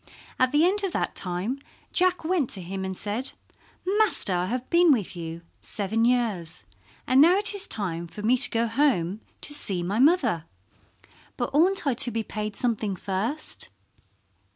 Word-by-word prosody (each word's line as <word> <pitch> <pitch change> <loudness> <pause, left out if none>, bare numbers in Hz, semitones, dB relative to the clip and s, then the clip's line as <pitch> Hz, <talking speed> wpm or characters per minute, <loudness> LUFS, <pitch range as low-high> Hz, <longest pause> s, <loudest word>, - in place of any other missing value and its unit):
At 255 0 +3
the 295 +3 +4
end 400 +3 +2
of 385 - -2
that - - -1
time 190 +9 -2 0.3
Jack 365 -1 +3
went 325 -7 +1
to 190 - +1
him 190 +2 -5
and 190 -1 -4
said, 225 +6 -1 0.7
"Master, 405 - +3
I 180 0 0
have 250 +4 -3
been 340 -1 +5
with 215 -9 0
you 165 0 -7 0.2
seven 220 +3 -1
years, 225 -9 0 0.4
and 260 +2 +5
now 345 +5 +6
it 415 +1 +2
is 400 -1 -1
time 170 -5 -3
for 210 +5 -9
me 235 +4 +4
to 250 - +5
go 230 0 0
home 225 - +1 0.2
to 290 - -3
see 195 -11 +1
my 200 +5 -1
mother. 255 - +3 0.9
But 240 +2 -2
oughtn't 360 +5 +3
I 275 - +2
to 245 +1 0
be 225 -1 -2
paid 210 -1 -5
something 220 -5 -1
first?" 200 - -3
230 Hz, 175 wpm, -25 LUFS, 190-295 Hz, 0.9 s, now